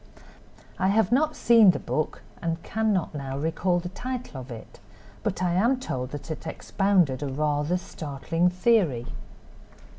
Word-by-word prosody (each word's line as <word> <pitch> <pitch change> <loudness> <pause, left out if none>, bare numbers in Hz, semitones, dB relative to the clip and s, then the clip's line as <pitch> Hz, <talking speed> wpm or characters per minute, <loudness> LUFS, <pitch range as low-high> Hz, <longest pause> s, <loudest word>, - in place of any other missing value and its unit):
I 190 - +2
have 210 +1 +3
not 305 +5 +2
seen 230 -4 +6
the 180 - +3
book 155 - -2 0.2
and 165 -1 -2
cannot 215 -7 0
now 135 -2 -4
recall 165 +4 0
the 175 0 -5
title 245 - -5
of 130 - -11
it, 115 -3 -10 0.4
but - - -2
I 175 -1 +1
am 235 +8 +3
told 130 - -4
that 145 +2 -7
it 155 +1 -6
expounded 180 -9 +1
a 145 - -2
rather 150 +4 0
startling 165 +1 -1
theory. 180 - +2
175 Hz, 150 wpm, -26 LUFS, 145-205 Hz, 0.4 s, seen